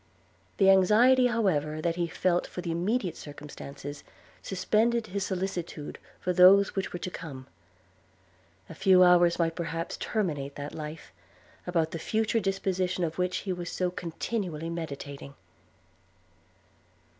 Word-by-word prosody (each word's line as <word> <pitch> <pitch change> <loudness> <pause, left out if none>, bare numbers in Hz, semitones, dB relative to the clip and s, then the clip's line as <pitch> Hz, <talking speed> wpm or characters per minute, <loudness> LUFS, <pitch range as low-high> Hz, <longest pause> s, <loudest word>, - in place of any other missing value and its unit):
The 195 -1 +6
anxiety 235 +7 +5
however 160 -10 0
that 165 +1 -1
he 170 -1 -1
felt 175 +1 0
for 180 - -6
the 170 -2 -3
immediate 185 +3 -1
circumstances, 145 -1 -9 0.4
suspended 220 +4 +1
his 200 -1 -3
solicitude 180 -5 -4 0.2
for 180 - -1
those 190 +2 +6
which 195 -1 -2
were - - -4
to 180 +1 -5
come. 140 -7 -8 1.2
A - - -9
few 185 -1 +5
hours 175 -1 +5
might 165 -1 +1
perhaps 165 -1 -4
terminate 150 -10 -2
that 145 0 -6
life, 155 0 -8 0.5
about 165 -3 0
the 165 - -4
future 220 +6 0
disposition 190 -2 -1
of 165 +1 -3
which 180 0 0
he 190 - -1
was 175 -1 -5
so 180 -1 -1
continually 170 -1 -4
meditating. 140 -4 -7
180 Hz, 135 wpm, -28 LUFS, 160-195 Hz, 1.2 s, The